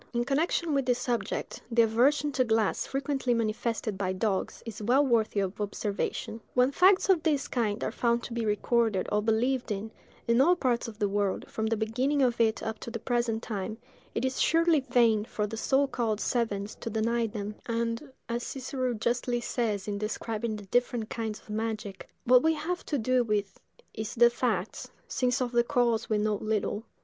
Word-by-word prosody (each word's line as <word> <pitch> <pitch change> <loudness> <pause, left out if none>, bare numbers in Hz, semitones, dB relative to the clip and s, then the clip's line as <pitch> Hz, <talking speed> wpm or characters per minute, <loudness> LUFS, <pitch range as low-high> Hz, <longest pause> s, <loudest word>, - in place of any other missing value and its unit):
In 240 0 0
connection 310 +3 +1
with 275 -2 +1
this 245 -1 +3
subject, 240 -2 -3
the 235 -1 +4
aversion 270 +7 +3
to 260 -2 +2
glass 220 -3 +1
frequently 270 -2 0
manifested 220 -2 -2
by 185 -2 0
dogs 195 0 -2
is 220 -2 -7
well 255 +7 +3
worthy 225 -5 +2
of 195 +2 -3
observation. 205 +2 -3
When 250 +2 +4
facts 375 +6 +5
of 375 -5 +4
this 295 -4 +1
kind 225 -3 -1
are - - -1
found 235 0 +1
to - - -6
be 235 -1 -1
recorded 220 -1 +1
or 210 - +2
believed 240 +3 +1
in, 210 +2 -3 0.4
in 235 +2 +4
all 350 +6 +5
parts 250 -7 0
of 220 -2 -9
the 210 -2 +1
world, 200 -1 -1
from 220 0 -2
the 225 0 0
beginning 255 +6 +1
of 240 -2 +2
it 220 -1 +2
up 220 -1 -4
to - - -7
the 230 - -4
present 235 -1 -1
time, 215 0 -4 0.4
it 235 - 0
is 260 0 -1
surely 330 -1 +4
vain 240 -5 +3
for 210 -1 -2
the 215 +2 -5
so 270 +5 +2
called 230 -5 -1
savants 210 -5 -1
to - - -5
deny 230 +1 0
them; 210 -1 -5
and, 230 +4 -2 0.2
as 235 +1 -2
Cicero 255 -1 -3
justly 240 +2 0
says 220 -5 -2
in 200 -1 -2
describing 220 +1 -3
the 205 -1 -9
different 240 +1 0
kinds 220 -2 -3
of - - -24
magic, 215 -2 -4
"What 250 +1 +6
we 320 +2 +3
have 350 +4 -3
to 290 - 0
do 255 +1 +2
with 205 -3 -2 0.3
is 215 -1 -5
the 240 0 +6
facts, 225 -6 -2 0.2
since 255 +1 +1
of 245 - -3
the 240 -1 +3
cause 235 -2 +1
we 215 - +2
know 210 0 +1
little. 215 +1 -2
230 Hz, 195 wpm, -29 LUFS, 215-250 Hz, 0.4 s, What